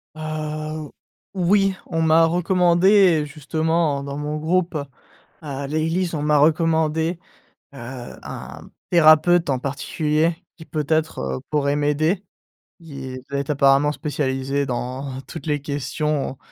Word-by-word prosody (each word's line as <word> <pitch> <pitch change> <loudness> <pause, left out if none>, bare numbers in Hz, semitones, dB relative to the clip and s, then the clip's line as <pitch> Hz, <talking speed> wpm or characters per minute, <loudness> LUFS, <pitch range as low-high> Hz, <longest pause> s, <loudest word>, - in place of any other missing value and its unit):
Heu, 155 -1 -5 0.4
oui, 195 +1 +2
on 165 -2 -1
m'a 160 +1 +5
recommandé 180 0 +4
justement 155 0 -1
dans 140 0 -5
mon 150 +1 -3
groupe 170 +2 0 0.7
à 140 -2 -5
l'église, 165 +4 -1
on 150 - -2
m'a 150 0 +3
recommandé, 160 +2 +2 0.6
heu, - - -12 0.4
un - - -9 0.2
thérapeute 170 0 +5
en 135 - +2
particulier 150 +4 -1 0.2
qui 160 - -12
peut-être, 155 +1 -1 0.2
heu, - - -6
pourrait 145 -1 +1
m'aider. 155 +6 +1 0.6
Il 135 -5 -7
doit 140 0 -2
être 140 +1 -2
apparemment 140 +1 +4
spécialisé 140 -2 -2
dans 130 +1 -4
toutes 140 +2 -9
les 150 -2 -1
questions, 145 0 -2
155 Hz, 120 wpm, -22 LUFS, 140-165 Hz, 0.7 s, m'a